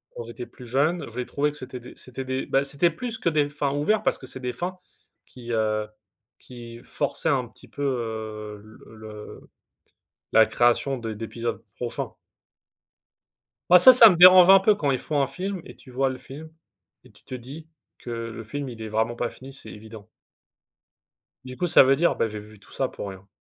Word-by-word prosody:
quand 120 - -6
j'étais 120 +1 -8
plus 125 - -14
jeune, 150 +8 0
j'ai 125 -1 -5
trouvé 145 +1 -1
que 150 - -10
c'était 130 -1 -8
des 120 - -13
c'était 130 +1 -8
des 130 +1 -3
ben 135 +1 +1
c'était 145 +5 +1
plus 225 +7 -5
que 170 - 0
des 150 -2 +1
fins 145 -1 -2
ouverts, 175 +9 +1
parce - - +1
que 130 - -11
c'est 130 - -9
des 125 -1 -4
fins 180 +7 -5 0.5
qui, 120 -2 -10
heu, 110 -1 0 0.5
qui 120 -2 -11
forçaient - - -2
un - - 0
petit - - -17
peu, 145 - -10
heu, 110 -5 -4
le 110 +1 -16
le 110 -1 -11 0.8
la 110 0 +6
création 120 +2 +1
de 115 -2 -5
d'épisodes 115 +1 -5
prochains. 120 -1 -5 1.6
Bah 180 - +9
ça, 255 +8 +9
ça 230 -4 +9
me 175 - +1
dérange 185 +1 +9
un 195 - +9
peu 210 +2 +4
quand 145 -8 -1
ils 130 - 0
font 145 -2 -1
un - - +1
film 190 +4 -5
et - - -13
tu 130 - -16
vois 135 +2 0
le 130 - -6
film 155 +4 -11 0.5
et - - -18
tu - - -22
te 130 - -8
dis 140 +6 -10 0.3
que 120 - -9
le 115 -1 -6
film, 140 +5 -5
il 115 -2 -9
est 110 - -6
vraiment 110 +2 -1
pas 120 0 -3
fini, 135 +1 -12
c'est 135 - -11
évident. 110 0 -12 1.4
Du 130 0 -9
coup, 180 - -1
ça 160 - +7
veut 135 +1 +3
dire: 170 +3 +2
«Bah 115 - 0
j'ai 105 -1 -7
vu 105 0 -13
tout - - -20
ça - - -1
pour 100 - -7
rien». 95 0 -11
130 Hz, 210 wpm, -24 LUFS, 115-150 Hz, 1.6 s, Bah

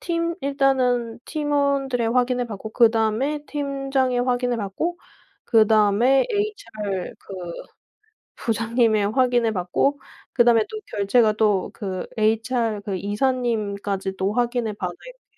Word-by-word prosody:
팀 335 0 -1
일단은 260 -4 +1
팀원들의 280 -5 0
확인을 250 0 +1
받고 220 0 -7
그다음에 230 +6 +2
팀장이 275 -3 -1
확인을 245 -2 0
하고 320 - -3 0.5
그다음에 220 +3 +4
HR 230 - -3
그 195 - -11 1.0
부장님의 225 -2 +1
확인을 245 -3 +2
받고 200 +10 0 0.3
그다음에 235 -3 +5
또 435 - -6 0.2
결제가 215 +2 +3
또 210 -3 +1
그 190 -4 -5
HR 225 0 0
그 195 -2 -2
이사님까지도 205 -4 -1
확인을 240 -2 0
받아야 180 -3 -5
돼요. - - -15
235 Hz, 265 characters per minute, -23 LUFS, 215-270 Hz, 1.0 s, 그다음에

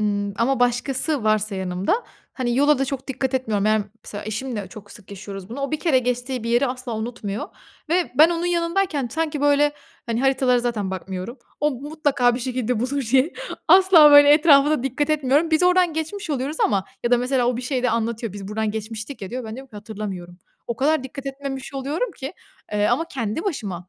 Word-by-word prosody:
ımm, 205 -1 -1
ama 245 +3 +1
başkası 250 +2 0
varsa 215 -1 +1
yanımda, 190 - -1 0.3
hani, 245 -2 -2
yola 290 +1 +4
da 270 - +1
çok 270 0 -5
dikkat 265 0 -2
etmiyorum. 215 -6 0
Yani, 215 0 +3
m 205 - -23
mesela 205 0 -7
eşimle 215 -1 -4
çok 205 -3 -12
sık 205 -1 -14
yaşıyoruz 195 0 -8
bunu. 255 +5 -6
O 275 - -2
1 310 - -2
kere 300 -7 +3
geçtiği 250 0 -2
bir 230 - -2
yeri 240 +4 +3
asla 250 -3 -4
unutmuyor 220 -2 -5 0.4
ve 345 -1 +1
ben 320 +3 +8
onun 340 +1 -1
yanındayken 335 -5 0
sanki, 315 -2 -2
böyle, 290 0 +3 0.3
hani, 230 +1 -1
haritalara 265 -2 +3
zaten 230 -5 -2
bakmıyorum. 190 +6 -6 0.2
O 300 0 +2
mutlaka 275 -2 0
bir 250 - -4
şekilde 250 -2 -2
bulur 275 +3 -1
diye, 270 +6 +4 0.4
asla 360 -4 +8
böyle 290 0 +8
etrafa 295 -2 +6
da 300 -5 +1
dikkat 280 +3 -1
etmiyorum. 295 +2 +2
Biz 315 +2 +3
oradan 360 -2 +4
geçmiş 320 +3 -4
oluyoruz 280 +3 -2
ama 195 -4 +1 0.2
ya 240 - +1
da 245 - +5
mesela 250 0 +1
o 245 -1 +1
bir 250 - -5
şeyde 250 -1 0
anlatıyor, 230 -2 -2
"Biz 200 -1 -8
buradan 215 0 -1
geçmiştik 220 +3 -6
ya." 190 - -6
diyor, 250 -1 -4
ben 220 0 -6
diyorum 270 0 -11
ki, 210 - -11
"Hatırlamıyorum." 200 -5 -7 0.3
O 235 - -3
kadar 300 +3 +2
dikkat 275 +1 -8
etmemiş 270 -1 -6
oluyorum 295 - -2
ki, 270 +5 -6 0.4
eee, 210 0 +2
ama 325 - +1
kendi 240 - -3
başıma 200 - -4
255 Hz, 200 wpm, -22 LUFS, 220-290 Hz, 0.4 s, ben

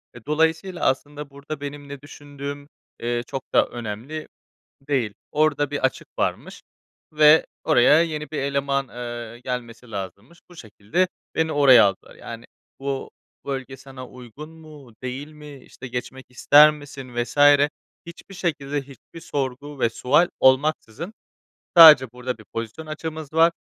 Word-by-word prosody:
Eee, 120 - -11
dolayısıyla 160 +4 0
aslında 145 +2 -2
burada 140 +1 -8
benim 145 0 -7
ne 140 -1 -8
düşündüğüm, 145 0 -9 0.3
eee, 120 0 -2
çok 135 - -5
da - - +5
önemli 120 +7 -7 0.6
değil. 120 -8 0 0.2
Orada 145 -1 +1
bir 145 -2 -4
açık 130 - -1
varmış - - -3 0.5
ve 150 +1 +6 0.2
oraya 150 +2 +5
yeni 155 -2 -4
bir 155 - -4
eleman, 140 -1 -1
eee, 120 -1 -7
gelmesi 125 -2 -6
lazımmış. 100 - -8
Bu 175 - -15
şekilde 115 - -2 0.3
beni 160 0 0
oraya 130 -6 +7
aldılar. 95 -1 -2
Yani - - -9 0.4
bu 135 -1 -4 0.4
bölge 135 -1 -5
sana 130 -1 -11
uygun 125 +5 -12
mu, 155 -7 -15
değil 130 +3 -5
mi, 150 -2 -12
işte, 130 0 -12
geçmek 130 +2 -6
ister 145 +4 +6
misin 140 -4 -10
vs. 120 +3 -3 0.7
hiçbir 175 +3 -12
şekilde 145 -5 -2
hiçbir 140 +4 -14
sorgu 140 0 -5
ve 115 - +2
sual 150 +9 +2
olmaksızın 145 - +1 0.7
sadece 150 -7 +10
"Burada 125 -1 -5
bir 110 - -16
pozisyon 115 +7 -6
açığımız 155 -1 -7
var, 165 +1 +5
140 Hz, 140 wpm, -23 LUFS, 125-150 Hz, 0.7 s, sadece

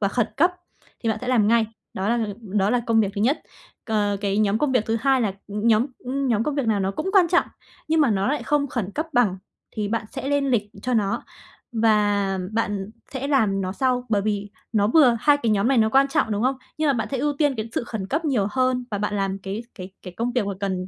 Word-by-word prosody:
và 200 - +2
khẩn 225 +2 0
cấp 345 +5 +4 0.5
thì 230 - 0
bạn 220 -1 0
sẽ 250 - -5
làm 230 -5 +3
ngay, 230 0 +4 0.3
đó 190 +2 -2
là, 235 +1 +2
ừ, 205 - -4
đó 200 -1 0
là 245 0 +2
công 225 -1 +4
việc 200 -2 0
thứ 200 - -3
nhất. 255 +8 +1 0.4
Cờ, 205 -3 0
cái 200 0 0
nhóm 215 0 +2
công 290 0 +1
việc 245 -4 +2
thứ 225 - +1
2 270 +1 +3
là, 215 -5 0 0.2
ừm, 205 +2 -3
nhóm, 225 +4 +4
ưm, 270 +2 -2
nhóm 225 -3 +2
công 295 +4 -1
việc 280 -4 -1
nào 210 -3 +2
nó 190 - 0
cũng 310 - -3
quan 370 -4 +5
trọng, 350 +1 +3 0.4
nhưng 320 0 +3
mà 285 -5 +4
nó 195 -2 +1
lại 295 - -1
không 295 -1 +1
khẩn 235 -7 -3
cấp 310 +7 -2
bằng 225 -7 +3 0.3
thì 210 -1 -3
bạn 225 0 -1
sẽ 270 0 -4
lên 285 -1 +1
lịch 210 -4 0
cho 250 -1 -1
nó, 200 -3 0 0.5
và 205 -3 +2
bạn 205 -3 -2 0.2
sẽ 270 +1 -3
làm 215 -9 +2
nó 185 -1 -2
sau, 250 +2 0
bởi 205 -3 +1
vì 205 -1 -2 0.2
nó 205 -2 +3
vừa 250 -2 +5
hai 290 +3 +5
cái 235 -6 -1
nhóm 210 +3 +2
này 270 - +3
nó 220 -1 +4
quan 270 +4 +4
trọng, 245 -5 +1
đúng 210 +1 -1
không? 260 +1 +1 0.2
Nhưng 310 - +1
mà - - +4
bạn 225 -4 -2
sẽ 270 - -2
ưu 295 +2 +1
tiên 290 -1 +1
cái 220 +1 -4
sự - - -2
khẩn 220 -5 -5
cấp 310 +7 -1
nhiều 250 -10 +1
hơn 255 +1 +1
và 205 - -2
bạn 210 0 -2
làm 195 -1 -1
cái 195 +4 -5
cái 185 +1 -8
cái 180 - -8
công 240 +2 -1
việc 240 -5 0
mà 200 - -2
cần 185 -2 -2
225 Hz, 265 wpm, -23 LUFS, 205-265 Hz, 0.5 s, quan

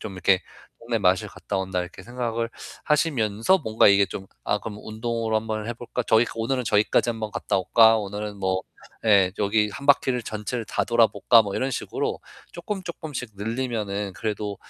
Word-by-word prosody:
좀 105 - -6
이렇게 95 0 +3 0.4
'동네 115 -1 -1
마실 95 -2 +2
갔다 - - -5
온다.' 95 -1 -2
이렇게 90 +1 -8
생각을 115 0 -3 0.4
하시면서 140 - +2
뭔가 110 - +3
이게 100 0 +5
좀 95 - -7 0.2
'아 105 - +1
그럼 105 +1 -7
운동으로 115 0 -2
한번 110 -1 -3
해 120 - -3
볼까? 120 +1 -4
저기 110 +2 +5
오늘은 125 +3 -1
저기까지 105 +2 +2
한번 110 -2 -4
갔다 - - -1
올까? 110 +4 +5
오늘은 105 0 -5
뭐 95 -1 0 0.4
예 100 -4 +5
여기 105 +1 +2
1 140 +7 -8
바퀴를 130 -3 +3
전체를 110 +2 -4
다 - - -1
돌아볼까?' 115 -1 +4
뭐 100 -2 -5
이런 130 - -1
식으로 - - -3 0.3
쪼끔쪼끔씩 170 - -6
늘리면은 105 -3 -3
그래도 105 +3 -3
110 Hz, 365 characters per minute, -24 LUFS, 100-120 Hz, 0.4 s, 이게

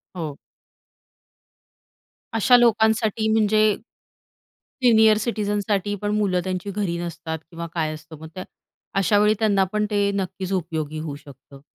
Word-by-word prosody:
हो. 155 -5 -5 2.0
अशा 235 +3 +5
लोकांसाठी 220 -2 +2
म्हणजे 215 -1 +3 1.2
सीनियर 220 -3 +6
सिटिझनसाठी 205 -2 -1
पण 205 0 -1
मुलं 185 -4 +1
त्यांची 185 +1 -3
घरी 190 -4 -2
नसतात 165 -1 -5
किंवा 170 0 -6
काय 155 -2 -1
असतं 155 0 -11
मग 160 - -9
त्या 185 - -5 0.6
अशावेळी 205 +3 +3
त्यांना 205 -3 +3
पण 210 0 +1
ते 205 -1 +2
नक्कीच 190 0 -3
उपयोगी 160 -4 -3
होऊ 155 -2 -5
शकतं. 140 -1 -15
195 Hz, 125 wpm, -23 LUFS, 165-215 Hz, 2.0 s, सीनियर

